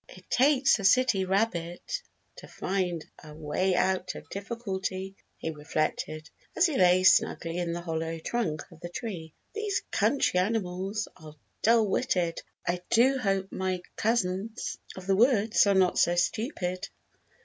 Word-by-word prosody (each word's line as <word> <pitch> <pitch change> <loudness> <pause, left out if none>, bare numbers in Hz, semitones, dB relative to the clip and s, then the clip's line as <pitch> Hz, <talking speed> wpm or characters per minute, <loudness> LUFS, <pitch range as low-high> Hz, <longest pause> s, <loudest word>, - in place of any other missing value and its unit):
"It 185 0 -14
takes 275 -1 +4
a - - -5
city 205 -1 +4
rabbit 190 - -1 0.4
to - - -11
find 180 -4 -2 0.2
a 150 -1 -11
way 160 +5 0
out 185 0 0
of - - -10
difficulty," 195 -3 -4 0.2
he 160 - -4
reflected, 155 0 -3 0.3
as 360 - +5
he 320 -6 0
lay 180 -3 +5
snugly 170 -2 +3
in 175 -1 -1
the 170 +1 -3
hollow 165 -1 -3
trunk 160 -3 -2
of 165 - -15
the 175 0 -7
tree. 175 -6 -6 0.2
"These 420 -2 -2
country 215 -3 +2
animals 195 0 -1
are 155 -1 -12 0.3
dull 225 -1 +4
witted. 175 -3 0 0.3
I 175 0 0
do 260 +4 +4
hope 195 -4 -1
my 185 -1 -2
cousins 215 0 -1 0.2
of 185 - -9
the 195 0 +2
woods 220 -2 +4
are 200 - +4
not 185 -1 +3
so 175 - +4
stupid. 185 - -1
190 Hz, 150 wpm, -28 LUFS, 175-225 Hz, 0.4 s, as